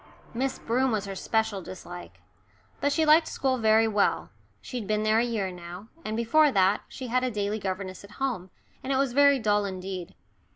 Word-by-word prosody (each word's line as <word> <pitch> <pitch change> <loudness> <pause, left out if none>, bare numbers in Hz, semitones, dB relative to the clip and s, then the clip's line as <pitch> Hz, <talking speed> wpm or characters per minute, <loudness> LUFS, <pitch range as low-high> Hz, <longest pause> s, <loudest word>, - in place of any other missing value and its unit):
Miss 260 +3 -1
Broom 255 +3 0
was 210 -2 -1
her 195 - -5
special 220 0 -1
dislike. 175 -1 -10 0.6
But 285 - +1
she 320 +2 +2
liked 310 +2 +6
school 260 -2 -1
very 220 0 +4
well, 210 -2 +1 0.3
she'd 240 -6 -6
been 215 0 0
there 215 +1 +3
a - - +3
year 220 -6 -2
now, 180 +4 -10
and 215 +1 -3
before 285 +6 +4
that 195 -1 +3
she 260 - -8
had 250 +2 +1
a 255 - +1
daily 210 -1 -2
governess 190 -1 -4
at 200 +1 -13
home, 245 -9 -2 0.3
and 265 - -3
it - - +2
was 270 -2 +1
very 280 +1 +6
dull 210 -3 +2
indeed. 185 -2 -6
220 Hz, 195 wpm, -27 LUFS, 195-255 Hz, 0.6 s, liked